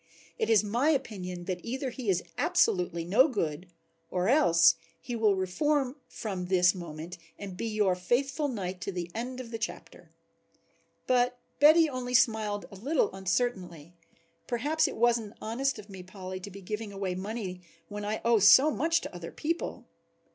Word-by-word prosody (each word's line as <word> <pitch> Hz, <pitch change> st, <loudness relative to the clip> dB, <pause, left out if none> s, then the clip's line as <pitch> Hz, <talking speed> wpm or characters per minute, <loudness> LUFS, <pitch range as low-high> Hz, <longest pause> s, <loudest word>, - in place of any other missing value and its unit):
"It -, -, 0 dB
is 215 Hz, -2 st, +5 dB
my 235 Hz, +8 st, +1 dB
opinion 185 Hz, -, -2 dB
that 180 Hz, -1 st, -3 dB
either 260 Hz, +2 st, -3 dB
he 240 Hz, -3 st, -4 dB
is 180 Hz, -2 st, +2 dB
absolutely 175 Hz, -2 st, +1 dB
no 220 Hz, -, +5 dB
good 175 Hz, -, -3 dB, 0.4 s
or 180 Hz, +3 st, 0 dB
else 170 Hz, -, +6 dB, 0.3 s
he 245 Hz, -2 st, -5 dB
will 215 Hz, -3 st, +3 dB
reform 260 Hz, -, 0 dB
from 190 Hz, -5 st, -5 dB
this 180 Hz, -1 st, +4 dB
moment 170 Hz, -1 st, -8 dB, 0.2 s
and 195 Hz, -3 st, -7 dB
be 230 Hz, -, -3 dB
your 210 Hz, -4 st, +2 dB
faithful 270 Hz, -, 0 dB
knight 190 Hz, -7 st, -4 dB
to 200 Hz, -, -3 dB
the 175 Hz, -2 st, -5 dB
end 250 Hz, +3 st, -4 dB
of 240 Hz, -2 st, -8 dB
the 225 Hz, -, -4 dB
chapter." 220 Hz, -, -7 dB, 1.0 s
But 250 Hz, 0 st, +2 dB, 0.2 s
Betty 315 Hz, +3 st, +7 dB
only 250 Hz, -3 st, -3 dB
smiled 215 Hz, -3 st, +2 dB
a -, -, -10 dB
little 265 Hz, 0 st, 0 dB
uncertainly. 185 Hz, -5 st, -2 dB, 0.5 s
"Perhaps 290 Hz, +7 st, +1 dB
it -, -, -5 dB
wasn't 230 Hz, -2 st, +1 dB
honest 260 Hz, +5 st, -1 dB
of 210 Hz, -1 st, -10 dB
me, 190 Hz, -3 st, -9 dB
Polly, 185 Hz, 0 st, -8 dB
to 190 Hz, -, -8 dB
be 200 Hz, 0 st, -11 dB
giving 210 Hz, +2 st, -5 dB
away 195 Hz, -2 st, -3 dB
money 190 Hz, -1 st, -5 dB, 0.3 s
when 205 Hz, 0 st, -6 dB
I 210 Hz, +1 st, -2 dB
owe 230 Hz, -1 st, +5 dB
so 260 Hz, +9 st, +7 dB
much 330 Hz, +3 st, +1 dB
to -, -, -8 dB
other 170 Hz, -1 st, -7 dB
people." 330 Hz, +3 st, -3 dB
210 Hz, 170 wpm, -29 LUFS, 185-250 Hz, 1.0 s, Betty